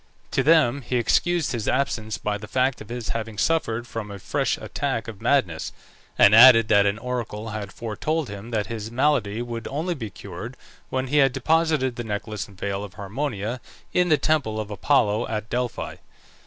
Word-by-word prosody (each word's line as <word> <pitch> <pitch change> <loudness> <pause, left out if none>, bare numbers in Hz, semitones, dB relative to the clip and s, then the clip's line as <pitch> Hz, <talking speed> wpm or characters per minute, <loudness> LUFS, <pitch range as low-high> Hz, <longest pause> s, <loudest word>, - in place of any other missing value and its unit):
To - - +2
them 145 -4 +4
he 125 - -3
excused 165 +7 +2
his 115 -4 -3
absence 115 -5 0
by 105 0 -2
the 105 - -9
fact 130 +4 0
of 110 - -10
his 120 -2 -5
having 110 -2 -4
suffered 120 -6 0
from 115 -3 -6
a 100 - -7
fresh - - -1
attack - - -3
of - - -8
madness, - - +1 0.5
and 100 - +7
added 115 -1 +9
that 100 0 +5
an 100 +1 0
oracle 115 -2 -4
had 105 -2 -5
foretold 145 +8 -2
to 105 - -8
him 100 +3 -8
that 110 -3 -1
his 110 +1 -5
malady 120 -4 +1
would 120 -1 -5
only 160 +6 -2
be 120 -9 -6
cured - - -8 0.3
when 130 0 -1
he 150 - +2
had 135 -3 +5
deposited 155 -2 +1
the 120 - -3
necklace 105 -1 -4
and 100 -2 -17
veil 100 +1 -3
of 100 - -9
Harmonia 110 +2 -3 0.3
in 180 0 +3
the 155 - +5
temple 145 -10 0
of 105 -1 -5
Apollo 105 0 +2
at 110 0 -4
Delphi. 125 -1 -3
115 Hz, 190 wpm, -24 LUFS, 105-135 Hz, 0.5 s, added